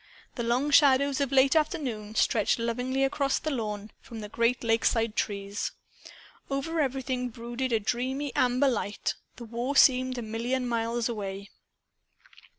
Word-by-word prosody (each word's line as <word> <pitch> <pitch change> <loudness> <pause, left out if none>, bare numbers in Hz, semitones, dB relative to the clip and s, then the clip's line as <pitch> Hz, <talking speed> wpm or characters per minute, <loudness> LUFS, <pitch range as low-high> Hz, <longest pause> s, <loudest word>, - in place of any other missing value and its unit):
The 240 - -4
long 245 +5 0
shadows 280 -1 +5
of 280 -2 0
late 270 +2 +4
afternoon 265 - -1
stretched 215 -2 +2
lovingly 250 +3 -1
across 275 0 +1
the 310 - -3
lawn, 215 -4 -4
from 225 -2 -9
the 210 - -7
great 235 +3 +1
lakeside 225 -1 +1
trees. 200 0 -2 0.8
Over 280 +4 -2
everything 260 -2 -2
brooded 240 +2 -4
a 225 - +3
dreamy 260 +6 -2
amber 255 +2 +3
light. 215 -5 -1 0.2
The 235 - -9
war 240 +5 -3
seemed 255 -1 +5
a 240 - -3
million 240 +4 -2
miles 230 0 -1
away. 200 -3 -5
245 Hz, 145 wpm, -28 LUFS, 225-270 Hz, 0.8 s, shadows